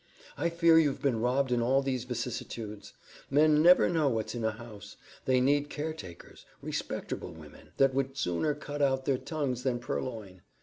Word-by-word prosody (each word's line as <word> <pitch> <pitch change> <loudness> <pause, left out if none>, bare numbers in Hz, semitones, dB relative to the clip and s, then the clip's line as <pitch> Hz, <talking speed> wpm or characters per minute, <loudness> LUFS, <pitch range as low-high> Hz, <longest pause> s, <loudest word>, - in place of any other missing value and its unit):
I 170 - 0
fear 170 -1 +5
you've 145 -4 +1
been 130 -5 +1
robbed 125 +3 +1
in 120 -1 +2
all 135 +3 +2
these 130 -3 -2
vicissitudes. 115 -3 -5 0.4
Men 150 +2 +4
never 175 +3 +7
know 160 -5 +2
what's 110 -3 -2
in 120 -2 -4
a 110 - +2
house. 110 -2 -10 0.3
They 130 -1 +3
need 145 +3 +2
caretakers; 145 - -7 0.2
respecterble - - -4
women, 75 -2 -14
that 135 -1 +4
would 135 0 -2
sooner 90 - 0
cut 145 0 -6
out 135 -1 +1
their 135 -2 +1
tongues 140 -7 -3
than 125 -1 0
purloin. 110 -6 -5
130 Hz, 170 wpm, -30 LUFS, 115-145 Hz, 0.4 s, never